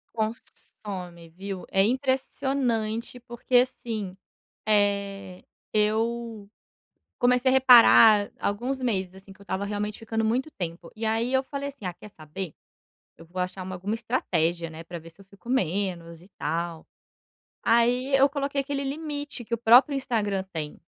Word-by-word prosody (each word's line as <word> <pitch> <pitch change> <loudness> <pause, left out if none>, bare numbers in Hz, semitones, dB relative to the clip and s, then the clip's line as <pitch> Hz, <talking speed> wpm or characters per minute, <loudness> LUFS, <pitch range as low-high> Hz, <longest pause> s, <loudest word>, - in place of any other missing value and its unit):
Consome, 190 -6 -6
viu? 190 +2 -7
É 195 - +4
impressionante, 255 -2 -1
porque 245 +1 -2
assim, 225 -6 0 0.5
eh, 200 -2 0 0.3
eu 220 0 0 0.7
comecei 250 +1 +3
a - - +2
reparar 230 -5 +7
alguns 245 +6 -2
meses, 190 -7 -1
assim, 195 0 -13
que 190 - -21
eu 200 - -15
tava 190 +1 -2
realmente 210 +1 -3
ficando 225 0 -2
muito 255 +7 0
tempo, 170 - -6
e 225 - -4
aí 225 +3 0
eu 265 0 +3
falei 280 +1 -5
assim: 275 -7 -11
"Ah 180 -2 -3
quer 210 +4 -13
saber, 155 +2 -8 0.6
eu 165 - -14
vou 180 +2 -6
achar 185 +1 -3
uma 185 0 -6
alguma 195 +4 -3
estratégia, 175 -8 -1
né, 160 +1 -9
pra 170 0 -7
ver 165 +1 -13
se 170 +4 -23
eu - - -14
fico 200 +4 -17
menos 180 -7 -1
e 185 - -18
tal." 170 -1 -3 0.8
Aí 245 +4 +3
eu 275 +1 +5
coloquei 280 0 -2
aquele 275 0 -3
limite 290 -3 -4
que 235 - -2
o - - -3
próprio 245 +5 +6
Instagram 210 -7 -1
tem, 155 -2 -5
215 Hz, 155 wpm, -26 LUFS, 190-250 Hz, 0.8 s, reparar